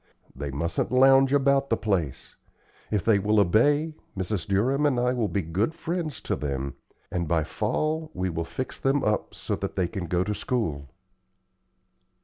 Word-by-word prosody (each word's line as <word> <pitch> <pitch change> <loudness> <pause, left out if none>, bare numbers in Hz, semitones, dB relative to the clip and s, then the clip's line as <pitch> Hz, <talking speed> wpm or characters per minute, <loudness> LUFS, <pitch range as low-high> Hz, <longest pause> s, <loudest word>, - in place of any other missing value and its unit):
They 70 +2 -4
mustn't 75 +5 -2
lounge 135 +1 +6
about 140 0 +3
the 115 - +2
place. 95 -10 -2 0.5
If 105 -3 -1
they 110 -3 +4
will 105 +2 +2
obey, 145 - +3 0.2
Mrs. 95 -1 -2
Durham 130 +10 +2
and 130 -4 +1
I 125 +1 +2
will 120 -4 0
be 100 -2 -1
good 95 - -1
friends 165 -5 -3
to - - -1
them, 70 -2 -3 0.4
and 85 -2 -1
by 80 0 +2
fall 155 - -1
we 95 - -1
will 85 0 -2
fix 130 +10 -5
them 135 +1 +1
up 105 -1 0
so - - -3
that - - -4
they 90 -3 +1
can 90 -2 -5
go 90 +2 +1
to 105 +2 -2
school." 80 - -2
105 Hz, 170 wpm, -26 LUFS, 85-135 Hz, 0.5 s, lounge